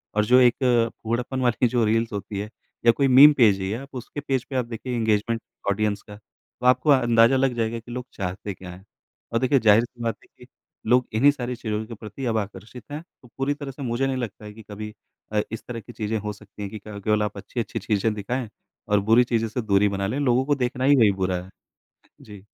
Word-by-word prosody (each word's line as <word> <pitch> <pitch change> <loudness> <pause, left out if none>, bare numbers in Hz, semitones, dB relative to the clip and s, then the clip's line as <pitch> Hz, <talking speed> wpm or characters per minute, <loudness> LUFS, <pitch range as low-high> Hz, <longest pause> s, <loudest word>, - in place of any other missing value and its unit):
और 105 0 +2
जो 125 +4 +6
एक 125 -1 +5 0.5
फूहड़पन 120 +3 -2
वाली 125 0 +2
जो 120 0 +1
रील्स 115 +2 +1
होती 100 0 -4
है 105 +1 -5 0.4
या 115 - +8
कोई 135 +4 +1
मीम 135 +3 +9
पेज 105 -6 +5
ही 95 0 -3
है 110 - -2
आप 140 0 -12
उसके 125 +3 -6
पेज 135 -3 -1
पे 135 - -5
आप 125 -2 +1
देखिए 120 +2 -5
इंगेजमेंट 115 0 0 0.3
ऑडियंस 100 0 0
का, 105 - -12
तो 110 +3 -15
आपको 125 +4 +4
अंदाज़ा 120 -2 +5
लग 135 -1 +2
जाएगा 115 0 -1
कि 115 +2 -13
लोग 125 0 -5
चाहते 95 +2 -4
क्या 90 -1 -10
हैं। 95 +3 -14 0.5
और 115 - +2
देखिए 130 +2 +3
ज़ाहिर-सी 115 +2 +3
बात 115 -3 -1
है - - -21
कि - - -14 0.4
लोग 125 +1 +3
इन्हीं 135 +7 +5
सारी 125 -3 -4
चीज़ों 110 -1 -3
के 115 - -9
प्रति 110 +4 -8
अब 115 -2 0
आकर्षित 105 +3 -6
हैं। 150 +1 -5 0.2
तो 125 - -17
पूरी 135 +2 0
तरह 145 -1 -7
से 135 - -12
मुझे 125 +2 0
नहीं 135 -1 -1
लगता 110 -4 -6
है 105 - -9
कि 110 +1 -13
कभी 105 +1 -7 0.4
अ 105 - +3
इस 115 - -6
तरह 120 -1 -5
की 120 +2 -12
चीज़ें 110 0 -2
हो 105 0 -4
सकती 105 0 -14
हैं 100 - -4
कि 110 - -7
क 100 -1 -7
केवल 105 0 +2
आप 105 -1 -4
अच्छी-अच्छी 115 +3 -4
चीज़ें 110 0 0
दिखाएँ 110 +3 -3 0.4
और 105 0 +3
बुरी 120 +2 +7
चीज़ें 115 -2 0
से 120 +3 -3
दूरी 105 -1 +3
बना 100 0 -2
लें 130 +8 -2
लोगों 130 -2 +2
को 145 +1 +2
देखना 125 -1 -2
ही 140 +2 +6
वही 110 -6 +5
बुरा 95 -1 -1
है। - - -13
अ, - - -16 0.7
जी। 105 -2 -13
115 Hz, 240 wpm, -24 LUFS, 105-125 Hz, 0.7 s, मीम